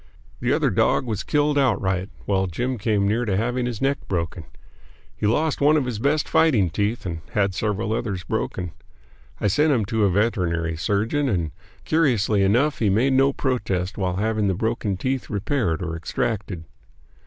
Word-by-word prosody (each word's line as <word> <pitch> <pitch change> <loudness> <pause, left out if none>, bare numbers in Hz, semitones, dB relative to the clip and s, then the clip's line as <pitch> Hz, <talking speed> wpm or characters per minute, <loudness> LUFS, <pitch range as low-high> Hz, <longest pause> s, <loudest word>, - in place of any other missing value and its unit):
The - - 0
other - - +2
dog - - +2
was 110 -5 -2
killed 145 0 +1
outright, 95 -7 +1 0.2
while 95 -1 +1
Jim 120 +8 -2
came 100 -2 +1
near 110 +4 +1
to 100 -5 0
having 125 +3 0
his 120 0 -4
neck 140 +1 +1
broken. 85 -3 -3 0.7
He 105 - -1
lost 150 +8 +1
one 150 +2 +5
of 145 - 0
his 120 -4 -3
best 145 +5 +1
fighting 140 - +3
teeth 105 +5 -1
and 85 -3 -4
had 100 -4 +1
several 110 +2 -1
others 100 -5 -3
broken. 90 +2 -3 0.7
I - - -3
sent 150 +10 +3
him 115 -7 +2
to 110 +1 0
a - - +3
veterinary 90 -5 0
surgeon, 110 - 0
and 85 -8 -1 0.3
curiously 120 -10 +2
enough 120 +10 +2
he 110 - +2
made 120 +8 +2
no 135 +1 +4
protest 105 -9 -2
while 90 -3 -1
having 110 +1 0
the 95 - +1
broken 110 -1 -1
teeth 130 +5 -2
repaired 100 - -1
or 80 -1 -3
extracted. 95 +1 -3
105 Hz, 175 wpm, -23 LUFS, 95-130 Hz, 0.7 s, one